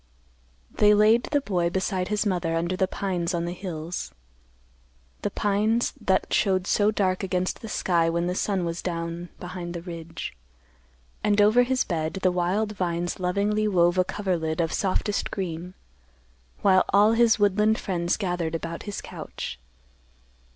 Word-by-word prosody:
They 210 Hz, 0 st, +5 dB
laid 215 Hz, +3 st, +5 dB
the 290 Hz, -1 st, 0 dB
boy 175 Hz, -8 st, 0 dB
beside 185 Hz, 0 st, -1 dB
his 210 Hz, +1 st, 0 dB
mother 175 Hz, -4 st, 0 dB
under 170 Hz, +2 st, 0 dB
the 190 Hz, 0 st, +1 dB
pines 180 Hz, -3 st, -2 dB
on 170 Hz, 0 st, -1 dB
the 175 Hz, -, -3 dB
hills; 175 Hz, -2 st, -5 dB, 1.1 s
the -, -, -1 dB
pines 210 Hz, +3 st, +1 dB
that 190 Hz, -2 st, +1 dB
showed 190 Hz, -3 st, +2 dB
so 205 Hz, +1 st, +3 dB
dark 190 Hz, -3 st, 0 dB
against 185 Hz, -1 st, -1 dB
the 225 Hz, -, -7 dB
sky 170 Hz, -4 st, +1 dB
when 170 Hz, +1 st, 0 dB
the 180 Hz, -, -1 dB
sun 190 Hz, -1 st, 0 dB
was 170 Hz, +1 st, -3 dB
down 170 Hz, 0 st, -4 dB
behind 175 Hz, -1 st, -6 dB
the 170 Hz, -, -4 dB
ridge. 165 Hz, -, -7 dB, 0.9 s
And 205 Hz, 0 st, +2 dB
over 215 Hz, +4 st, +6 dB
his 255 Hz, +1 st, +1 dB
bed 160 Hz, -3 st, -2 dB
the 185 Hz, -, +4 dB
wild 185 Hz, +5 st, 0 dB
vines 175 Hz, -3 st, -2 dB
lovingly 205 Hz, +4 st, +1 dB
wove 175 Hz, -2 st, +3 dB
a -, -, +5 dB
coverlid 175 Hz, -5 st, -2 dB
of 165 Hz, -1 st, 0 dB
softest 200 Hz, +1 st, 0 dB
green, 180 Hz, -1 st, -5 dB, 0.9 s
while 185 Hz, -1 st, +5 dB
all 205 Hz, +2 st, +5 dB
his 230 Hz, -1 st, +4 dB
woodland 210 Hz, +1 st, +3 dB
friends 175 Hz, -3 st, -1 dB
gathered 175 Hz, -5 st, -2 dB
about 165 Hz, 0 st, -5 dB
his 200 Hz, -, -4 dB
couch. 60 Hz, -, -7 dB
185 Hz, 155 wpm, -25 LUFS, 170-205 Hz, 1.1 s, over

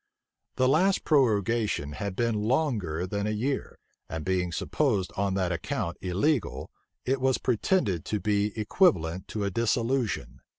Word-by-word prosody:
The 130 Hz, -, +3 dB
last 180 Hz, +8 st, +3 dB
prorogation 110 Hz, -, +2 dB
had 95 Hz, +5 st, -4 dB
been 115 Hz, +1 st, +1 dB
longer 105 Hz, -, 0 dB
than 100 Hz, +2 st, -2 dB
a -, -, 0 dB
year; 125 Hz, +6 st, -2 dB, 0.3 s
and 80 Hz, -1 st, -5 dB
being 90 Hz, -2 st, 0 dB
supposed 105 Hz, -, 0 dB
on 100 Hz, -1 st, 0 dB
that 95 Hz, -2 st, 0 dB
account 85 Hz, 0 st, -3 dB
illegal, 105 Hz, -, 0 dB, 0.3 s
it 130 Hz, +1 st, 0 dB
was 130 Hz, -1 st, +3 dB
pretended 110 Hz, -, +1 dB
to 105 Hz, -, -1 dB
be 105 Hz, +1 st, +1 dB
equivalent 95 Hz, -, +2 dB
to 105 Hz, -, -3 dB
a 100 Hz, -, -1 dB
dissolution. 115 Hz, -, -1 dB
105 Hz, 140 wpm, -27 LUFS, 90-130 Hz, 0.3 s, The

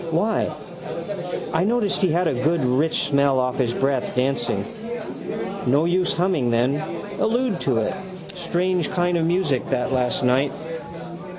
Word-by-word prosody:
Why? 175 Hz, +3 st, +1 dB, 1.0 s
I 160 Hz, +2 st, +3 dB
noticed 215 Hz, 0 st, +1 dB
he 185 Hz, -4 st, +3 dB
had 175 Hz, +2 st, +2 dB
a 160 Hz, -, +1 dB
good 145 Hz, +4 st, +1 dB
rich 140 Hz, +6 st, +2 dB
smell 140 Hz, -1 st, +3 dB
off 125 Hz, +1 st, 0 dB
his 120 Hz, -3 st, +2 dB
breath 135 Hz, 0 st, 0 dB
dancing. 125 Hz, -2 st, 0 dB, 1.0 s
No 140 Hz, +6 st, +4 dB
use 180 Hz, +1 st, +2 dB
humming 170 Hz, -8 st, +1 dB
then. 120 Hz, +4 st, +2 dB, 0.4 s
Allude 235 Hz, -4 st, +1 dB
to 130 Hz, -4 st, +1 dB
it. 110 Hz, -, +1 dB, 0.4 s
Strange 180 Hz, -1 st, 0 dB
kind 175 Hz, -1 st, +1 dB
of 165 Hz, -1 st, +2 dB
music 170 Hz, -7 st, +1 dB
that 130 Hz, 0 st, 0 dB
last 125 Hz, -1 st, +1 dB
night. 130 Hz, +3 st, +3 dB
150 Hz, 140 wpm, -23 LUFS, 130-180 Hz, 1.0 s, No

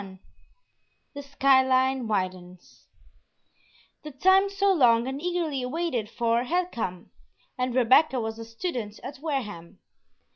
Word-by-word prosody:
XXI 190 Hz, -1 st, -12 dB, 0.9 s
THE 285 Hz, -, -7 dB
SKY 275 Hz, -1 st, +3 dB
LINE 260 Hz, -1 st, +1 dB
WIDENS 185 Hz, -3 st, -5 dB, 1.1 s
The 305 Hz, -, -8 dB
time 380 Hz, +8 st, +3 dB
so 395 Hz, 0 st, +1 dB
long 240 Hz, -7 st, +3 dB
and 265 Hz, +2 st, -5 dB
eagerly 335 Hz, -6 st, -2 dB
waited 255 Hz, -7 st, -3 dB
for 235 Hz, +1 st, 0 dB
had 355 Hz, +5 st, -1 dB
come, 185 Hz, -7 st, -5 dB, 0.4 s
and 250 Hz, -1 st, -2 dB
Rebecca 260 Hz, +2 st, +4 dB
was 220 Hz, 0 st, -5 dB
a 225 Hz, -, -7 dB
student 230 Hz, -, -5 dB
at 270 Hz, 0 st, -8 dB
Wareham. 235 Hz, -, -5 dB
255 Hz, 130 wpm, -26 LUFS, 225-300 Hz, 1.1 s, Rebecca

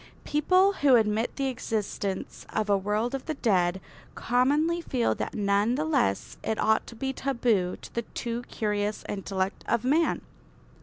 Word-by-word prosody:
People 370 Hz, +7 st, +3 dB
who 275 Hz, -3 st, +6 dB
admit 220 Hz, 0 st, +1 dB
the 275 Hz, -, -1 dB
existence 215 Hz, -6 st, -3 dB
of 215 Hz, -1 st, -1 dB
a -, -, +6 dB
world 210 Hz, +5 st, -1 dB
of 270 Hz, -, -4 dB
the 315 Hz, -, -2 dB
dead 190 Hz, -7 st, +2 dB, 0.4 s
commonly 290 Hz, +8 st, +2 dB
feel 255 Hz, -7 st, 0 dB
that -, -, -4 dB
none 205 Hz, +3 st, +2 dB
the 300 Hz, +3 st, -1 dB
less 275 Hz, -, 0 dB
it 220 Hz, -, -1 dB
ought 220 Hz, +1 st, +2 dB
to 235 Hz, -, -10 dB
be 265 Hz, +3 st, -2 dB
taboo 235 Hz, -10 st, 0 dB
to -, -, -11 dB
the 235 Hz, -, -1 dB
too 235 Hz, +1 st, -4 dB
curious 210 Hz, -1 st, -1 dB
intellect 195 Hz, -1 st, -3 dB
of 235 Hz, -1 st, +1 dB
man. 310 Hz, +6 st, +2 dB
230 Hz, 160 wpm, -27 LUFS, 205-270 Hz, 0.4 s, who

